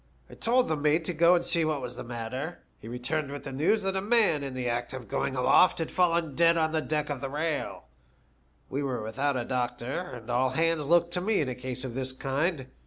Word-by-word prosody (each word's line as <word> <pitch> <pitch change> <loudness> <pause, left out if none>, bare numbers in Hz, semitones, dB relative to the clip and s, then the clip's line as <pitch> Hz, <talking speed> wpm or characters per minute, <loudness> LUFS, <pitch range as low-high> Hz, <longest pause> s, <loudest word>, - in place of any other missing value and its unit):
I - - -10
told 250 +2 +2
the 155 - +1
mate 150 +2 +1
to 180 - -1
go 170 +2 +5
and 175 - 0
see 170 -2 +2
what 155 -2 0
was 125 -2 -5
the - - -6
matter. 125 +7 -5 0.2
He - - -11
returned 140 +5 -2
with 145 - -6
the 135 - -6
news 165 +11 +2
that 195 0 -1
a 190 - 0
man 210 -8 +3
in 135 -2 -5
the 125 -1 -2
act 120 +1 -2
of 125 -4 -7
going 130 - -1
aloft 130 +8 +5
had 165 - -3
fallen 170 -4 +2
dead 170 +2 +4
on 160 -1 +2 0.2
deck 150 -1 -1
off 135 -3 -4
the 135 - -3
rail. 150 +1 -2 0.8
We 140 - -3
were 130 -5 -2
without 135 +5 -1
a 120 - -2
doctor, 125 +1 -2
and 115 -6 -9
all 125 +2 +2
hands 160 +2 0
looked 170 0 +4
to 180 - 0
me 210 +2 +1
in 140 - -1
a - - -2
case 125 +1 -5
of 125 - -5
this 130 +1 -2
kind. 135 +3 -1
145 Hz, 240 wpm, -28 LUFS, 130-165 Hz, 0.8 s, go